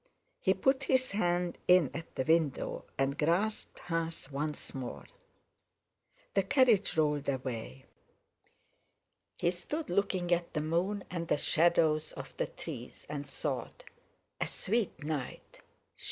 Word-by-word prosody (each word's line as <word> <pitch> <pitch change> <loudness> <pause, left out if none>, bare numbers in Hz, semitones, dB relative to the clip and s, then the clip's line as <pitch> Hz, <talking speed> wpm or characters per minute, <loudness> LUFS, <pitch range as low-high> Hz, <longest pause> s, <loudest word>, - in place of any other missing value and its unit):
He 190 -1 +3
put 265 +7 +2
his 260 -1 +2
hand 175 -3 0
in 180 -6 +6
at 165 - -7
the 130 - 0
window 160 -2 +1
and 135 +1 +1
grasped 180 +8 +1
hers 165 -4 -3
once 150 +2 -3
more. 130 -2 -5 1.3
The 195 - +4
carriage 210 - +4
rolled 150 -2 +2
away. 120 - -4 1.5
He 175 - +2
stood 295 - -4
looking 185 -2 +1
at 170 0 +1
the 150 - +1
moon 180 +6 0
and 170 -2 -3
the - - +2
shadows 160 -1 +3
of - - -8
the - - 0
trees, - - -8
and 145 -1 -4
thought: - - -3 0.6
"A - - 0
sweet 215 -6 -1
night! 150 -4 -5
170 Hz, 125 wpm, -32 LUFS, 150-190 Hz, 1.5 s, in